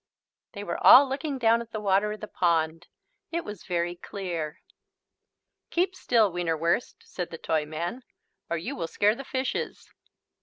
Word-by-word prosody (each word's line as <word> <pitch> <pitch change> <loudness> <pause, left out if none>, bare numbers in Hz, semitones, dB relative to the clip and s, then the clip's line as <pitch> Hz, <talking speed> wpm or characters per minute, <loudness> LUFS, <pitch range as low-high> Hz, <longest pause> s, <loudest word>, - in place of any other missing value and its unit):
They 205 -2 -6
were 170 -4 -4
all 275 +2 +10
looking 275 +1 -3
down 230 -1 +3
at 235 - -9
the 215 - -3
water 200 +1 +2
of 215 - -7
the 215 - -5
pond. 165 -2 0 0.4
It 340 0 -2
was 210 -3 -8
very 175 -1 -1
clear. 175 -4 -5 1.1
"Keep 370 +2 +1
still, 225 - +3
Wienerwurst," 170 +3 0
said 180 -2 -5
the 165 - -7
Toyman, 160 +9 -2 0.5
"or 170 - 0
you 165 - -4
will 165 - -3
scare 205 +5 +2
the 270 +4 -7
fishes." 260 0 -3
195 Hz, 155 wpm, -27 LUFS, 170-235 Hz, 1.1 s, all